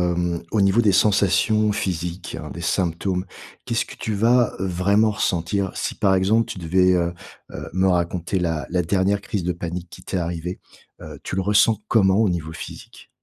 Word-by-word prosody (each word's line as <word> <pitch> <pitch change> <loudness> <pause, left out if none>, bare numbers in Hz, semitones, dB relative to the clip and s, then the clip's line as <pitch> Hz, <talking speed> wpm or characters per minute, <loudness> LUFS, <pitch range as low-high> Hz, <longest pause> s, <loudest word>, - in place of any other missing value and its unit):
hem, 85 -1 -1
au 110 - +2
niveau 100 +4 +4
des 105 -3 +4
sensations 105 +2 +3
physiques, 90 -3 -3
heu, - - -7
des 85 - -7
symptômes, 90 +1 -1 0.4
qu'est-ce 115 0 0
que - - -11
tu 110 - -3
vas 120 +2 +3
vraiment 95 +4 +2
ressentir? 95 0 -1
Si - - -2
par 95 -2 +2
exemple, 105 +4 +2
tu - - -7
devais, 90 +2 +3
heu 85 -1 0 0.4
heu, - - -7
me 95 +1 +2
raconter 90 +1 0
la 80 -3 -1
la 90 -1 +2
dernière 100 +3 +1
crise 100 -4 -3
de 90 0 -1
panique 85 0 -6
qui - - -12
t'est 95 - -3
arrivé, 85 +1 -4 0.4
heu, - - -9
tu - - -4
le 95 - +1
ressens 105 +2 +4
comment 95 -3 +4
au 110 - +3
niveau 80 -3 -3
physique? - - -10
95 Hz, 185 wpm, -22 LUFS, 85-100 Hz, 0.4 s, niveau